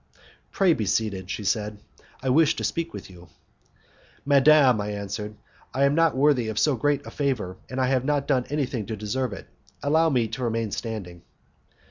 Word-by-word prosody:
"Pray 190 -4 +3
be 110 -8 -2
seated," 100 -4 -1
she 105 - -4
said, 105 +1 -1 0.5
"I 130 - 0
wish 155 +4 +4
to - - -5
speak 165 0 -2
with - - -8
you." 90 -2 -14 1.0
"Madam," 140 -4 +5
I 105 +1 -3
answered, 105 +1 -5 0.4
"I 135 - +2
am 140 +1 +4
not 165 -3 +2
worthy 135 -4 +3
of 110 -1 -4
so 150 +3 +3
great 145 +3 0
a - - -8
favour, 125 -11 -2
and 130 - -4
I 130 - +3
have 130 -1 +1
not 145 0 +1
yet - - -20
done 130 -4 +1
anything 130 -7 -2
to 110 - -4
deserve 110 +4 -2
it; 100 - -8 0.4
allow 160 +3 +3
me 125 -6 +1
to 125 +4 -5
remain 115 -2 -1
standing." 95 -6 -5
125 Hz, 190 wpm, -25 LUFS, 105-145 Hz, 1.0 s, Madam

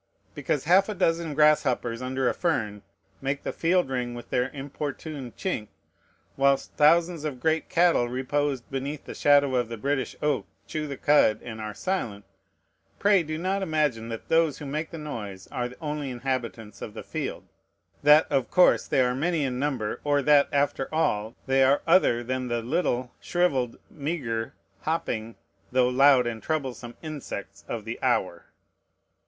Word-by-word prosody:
Because - - -1
half 190 +6 +4
a 210 - -3
dozen 165 -4 0
grasshoppers 130 -6 +3
under 130 0 -1
a - - +2
fern 110 - -1 0.4
make 140 +1 -2
the - - -3
field 175 0 +2
ring 125 -2 -2
with 120 - -10
their 125 +1 +1
importunate 140 -1 -6
chink, 120 - -2 0.7
whilst 140 0 +2
thousands 165 +1 +4
of 145 -5 -4
great 160 +3 0
cattle 170 -8 +3
reposed 135 +1 -1
beneath 135 +2 -4
the - - -7
shadow 145 -2 +4
of 120 -2 +1
the 115 - -5
British 135 +3 -1
oak 150 -3 0 0.2
chew 155 -1 -4
the 140 -2 -5
cud 145 -8 +4
and 110 -2 -7
are 105 -1 -5
silent, 115 - -3 0.7
pray 200 -2 +4
do 155 -1 -4
not 190 +4 -1
imagine 150 -10 0
that 115 -1 -6
those 165 -3 +3
who 145 - -8
make 155 +3 -3
the 165 - -8
noise 105 -11 -6
are 120 - -2
the 125 - -14
only 150 -3 -3
inhabitants 120 -4 -4
of 105 - -7
the - - -6
field, - - -4 0.6
that, 150 +2 +7
of 135 -3 +1
course, 180 0 +4
they 135 - +2
are 125 0 +2
many 160 +4 0
in 125 -2 -2
number, 130 -7 -2
or 145 -1 +2
that, 145 0 +5
after 140 -2 0
all, 115 -8 0
they 135 0 +3
are 135 +2 +3
other 165 -9 +4
than 130 +1 -2
the 120 -1 -2
little, 125 -3 -1
shrivelled, 140 -9 0
meagre, 140 -8 -3 0.2
hopping, 115 -8 -2 0.4
though 125 0 +3
loud 130 0 +5
and 115 -2 -3
troublesome 130 -6 -3
insects 100 -10 -7
of 110 -3 -5
the 115 +1 -6
hour. 95 -9 0
135 Hz, 165 wpm, -26 LUFS, 120-155 Hz, 0.7 s, that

